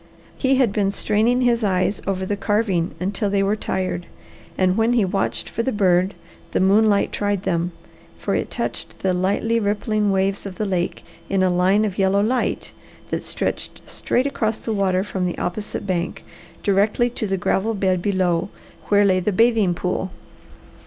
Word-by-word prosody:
He 270 0 +2
had 255 -5 +3
been 200 -2 +1
straining 220 +5 +1
his 240 -2 +2
eyes 190 0 +1
over 190 -1 -1
the 205 - -1
carving 200 -4 0
until 200 +3 -1
they 200 0 +2
were 200 +2 +1
tired, 185 -4 -3 0.5
and 185 0 +2
when 225 +2 +2
he 230 -5 +3
watched 195 +1 -1
for 230 - -2
the 260 - -1
bird 185 -2 +2 0.4
the - - +2
moonlight 200 +2 +3
tried 205 -2 -1
them; 170 -1 0 0.5
for - - -2
it - - -1
touched - - -4
the 190 -1 +1
lightly 200 +5 +1
rippling 210 0 0
waves 195 +1 0
of 190 - -8
the 215 - -2
lake 180 -3 -2 0.3
in 195 -1 +2
a 185 - +3
line 190 +4 +3
of 200 -1 -4
yellow 195 +1 +3
light 245 +3 -1 0.4
that - - -2
stretched - - -4
straight 250 - -1
across 225 -5 -1
the 225 - -4
water 190 -2 +1
from 190 -3 -2
the 175 - -4
opposite 205 +3 -4
bank, 180 -3 -2 0.4
directly 205 +4 +2
to 225 -2 -3
the 195 0 0
gravel 205 +4 0
bed 185 -2 +1
below, 185 -2 +1 0.4
where 205 0 +4
lay 185 -2 +3
the 185 +3 0
bathing 220 -3 +3
pool. 185 +1 -2
200 Hz, 175 wpm, -22 LUFS, 185-215 Hz, 0.5 s, where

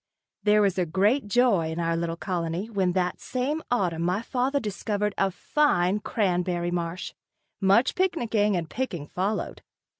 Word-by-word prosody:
There 210 0 +4
was 195 -2 +1
great 205 - +2
joy 205 -7 +3
in 160 - -4
our 165 0 0
little 165 0 -2
colony 175 +3 -3
when 190 -4 +1
that 180 -1 -1
same 275 +5 -2
autumn 180 -9 0
my 180 +6 0
father 260 +4 0
discovered 210 -2 -2
a 195 - +2
fine 195 -4 +1
cranberry 180 -4 0
marsh. 170 0 -3 0.5
Much 200 +6 +4
picnicking 230 - +1
and 165 -2 -3
picking 180 - -4
followed. 190 +7 -3
195 Hz, 145 wpm, -26 LUFS, 175-230 Hz, 0.5 s, There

